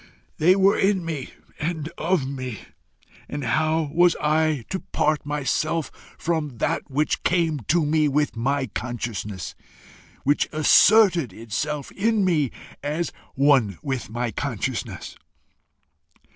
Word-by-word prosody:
They 180 Hz, +4 st, +5 dB
were 195 Hz, +1 st, +4 dB
in 195 Hz, -3 st, +2 dB
me 155 Hz, -5 st, -4 dB, 0.3 s
and 160 Hz, -1 st, -2 dB
of 170 Hz, -4 st, 0 dB
me, 130 Hz, -5 st, -5 dB, 0.7 s
and 145 Hz, 0 st, -4 dB
how 155 Hz, +4 st, +1 dB
was 175 Hz, +1 st, +5 dB
I 155 Hz, -4 st, +1 dB
to 190 Hz, -, -1 dB
part 150 Hz, -4 st, -1 dB
myself 150 Hz, +2 st, -1 dB, 0.3 s
from 155 Hz, -6 st, -2 dB
that -, -, -1 dB
which 145 Hz, +3 st, 0 dB
came 165 Hz, -4 st, +1 dB
to 165 Hz, -1 st, +3 dB
me 155 Hz, 0 st, +2 dB
with 145 Hz, 0 st, 0 dB
my 135 Hz, +4 st, 0 dB
consciousness, 110 Hz, -5 st, -5 dB, 0.7 s
which 145 Hz, +2 st, +2 dB
asserted 175 Hz, -, +5 dB
itself 135 Hz, +7 st, -4 dB
in 215 Hz, 0 st, +1 dB
me 155 Hz, -7 st, +2 dB, 0.3 s
as 150 Hz, +4 st, -2 dB, 0.2 s
one 135 Hz, -, +3 dB
with 130 Hz, -6 st, -3 dB
my 120 Hz, +1 st, -2 dB
consciousness? -, -, -4 dB
150 Hz, 120 wpm, -24 LUFS, 130-165 Hz, 0.7 s, They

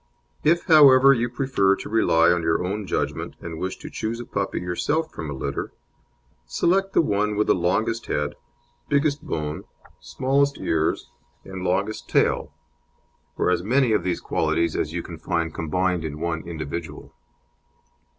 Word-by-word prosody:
If, 170 Hz, +3 st, +3 dB
however, 140 Hz, -4 st, +7 dB
you 120 Hz, -1 st, 0 dB
prefer 120 Hz, -7 st, +1 dB
to -, -, -8 dB
rely 85 Hz, -6 st, +4 dB
on 85 Hz, 0 st, +1 dB
your 80 Hz, +2 st, 0 dB
own 100 Hz, +2 st, -3 dB
judgment, -, -, -2 dB
and 80 Hz, -1 st, -7 dB
wish 95 Hz, 0 st, -3 dB
to -, -, -10 dB
choose 115 Hz, +2 st, -3 dB
a 120 Hz, -, -6 dB
puppy 100 Hz, -2 st, -3 dB
yourself 145 Hz, -, -1 dB
from 80 Hz, -, -6 dB
a -, -, -4 dB
litter, 70 Hz, +1 st, -4 dB, 0.7 s
select 195 Hz, -, +1 dB
the -, -, +4 dB
one 105 Hz, -3 st, 0 dB
with 105 Hz, +1 st, +2 dB
the -, -, +4 dB
longest 105 Hz, +6 st, 0 dB
head, 75 Hz, 0 st, -1 dB, 0.6 s
biggest 145 Hz, 0 st, +1 dB
bone, 75 Hz, 0 st, -4 dB, 0.4 s
smallest 140 Hz, +1 st, 0 dB
ears, 80 Hz, -5 st, -1 dB, 0.3 s
and 95 Hz, -1 st, -7 dB
longest 100 Hz, +4 st, -1 dB
tail, -, -, +1 dB, 0.9 s
or -, -, +2 dB
as 90 Hz, -, +1 dB
many 125 Hz, +5 st, +2 dB
of 105 Hz, -, +2 dB
these 90 Hz, -1 st, -1 dB
qualities 85 Hz, -1 st, 0 dB
as 75 Hz, -, -1 dB
you 85 Hz, 0 st, -4 dB
can 85 Hz, -2 st, -9 dB
find 85 Hz, -2 st, -2 dB
combined 90 Hz, +2 st, -1 dB
in 75 Hz, -1 st, -5 dB
one 85 Hz, 0 st, -3 dB
individual. 80 Hz, 0 st, -6 dB
95 Hz, 160 wpm, -24 LUFS, 85-125 Hz, 0.9 s, however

